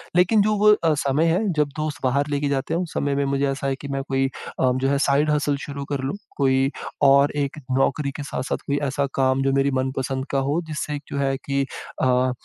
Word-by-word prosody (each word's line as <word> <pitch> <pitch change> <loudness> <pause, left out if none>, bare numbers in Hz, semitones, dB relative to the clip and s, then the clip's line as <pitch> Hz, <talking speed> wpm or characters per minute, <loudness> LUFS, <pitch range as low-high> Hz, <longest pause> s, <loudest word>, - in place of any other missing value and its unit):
लेकिन 185 +5 +4
जो 215 +1 +2
वो 210 +1 +5
अ, 165 -6 +2
समय 140 +1 +1
है 165 +2 +3
जब 150 -2 +2
दोस्त 155 -1 -3
बाहर 140 +3 +1
लेके 145 0 0
जाते 140 +2 -1
हैं 170 - +1
उस 175 -3 -6
समय 140 -1 0
भी 140 0 +1
मुझे 140 0 0
ऐसा 135 0 -3
है 135 - 0
कि 140 - -9
मैं 135 -1 -3
कोई 135 0 +2 0.3
अ, 130 - +3
जो 130 +1 0
है 140 - +2
साइड 145 +2 +3
हसल 145 -1 +1
शुरू 140 -1 -6
कर 140 - -1
लूँ। 135 +6 -2 0.2
कोई 135 -1 +3 0.4
और 140 +1 +5
एक 140 - -8 0.2
नौकरी 140 +1 +1
के - - -3
साथ-साथ 130 -2 -3
कोई 140 - +1
ऐसा 140 +1 -1
काम 130 0 +2
जो 135 - +2
मेरी 140 +1 +2
मनपसंद 130 0 -2
का 135 - +1
हो, 155 +4 +1
जिससे 150 -1 -3
एक 145 - -6
जो - - -3
है 135 -1 +1
कि 140 0 0 0.4
अ, 130 0 +3
140 Hz, 235 wpm, -23 LUFS, 135-150 Hz, 0.4 s, वो